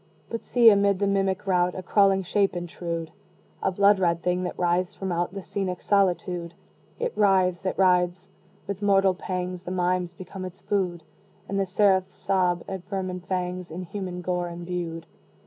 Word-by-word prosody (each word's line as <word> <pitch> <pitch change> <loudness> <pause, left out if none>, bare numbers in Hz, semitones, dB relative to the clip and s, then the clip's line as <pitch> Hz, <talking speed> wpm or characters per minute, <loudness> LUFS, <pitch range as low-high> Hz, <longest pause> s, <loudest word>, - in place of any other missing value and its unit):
But 230 - -4
see, 235 -2 +6
amid 200 -1 +3
the 200 - 0
mimic 195 -1 0
rout, 180 -2 +2
A 185 - -5
crawling 195 0 +3
shape 195 +1 +1
intrude! 170 -1 -4 0.5
A 190 - +1
blood 200 +1 +4
red 170 -2 +1
thing 180 0 +1
that - - -5
writhes 175 0 +1
from 190 -1 -4
out 175 +2 -1
The 195 - -5
scenic 185 -2 -3
solitude! 180 -3 +1 0.4
It 485 -1 -2
writhes! 190 -3 +3
it - - -2
writhes! 180 0 +2 0.3
with 200 0 -5
mortal 195 -2 +4
pangs 180 -1 -4
The 180 - -6
mimes 180 -1 0
become 185 +1 -8
its 185 +1 -8
food, 180 -5 -1 0.4
And 195 0 -1
the 195 - 0
seraphs 190 -1 +2
sob 180 -3 +1
at 190 -2 -5
vermin 185 -2 -3
fangs 180 0 -3
In 175 +3 -6
human 180 -1 -5
gore 180 0 -1
imbued. 170 -1 -5
185 Hz, 170 wpm, -26 LUFS, 180-195 Hz, 0.5 s, see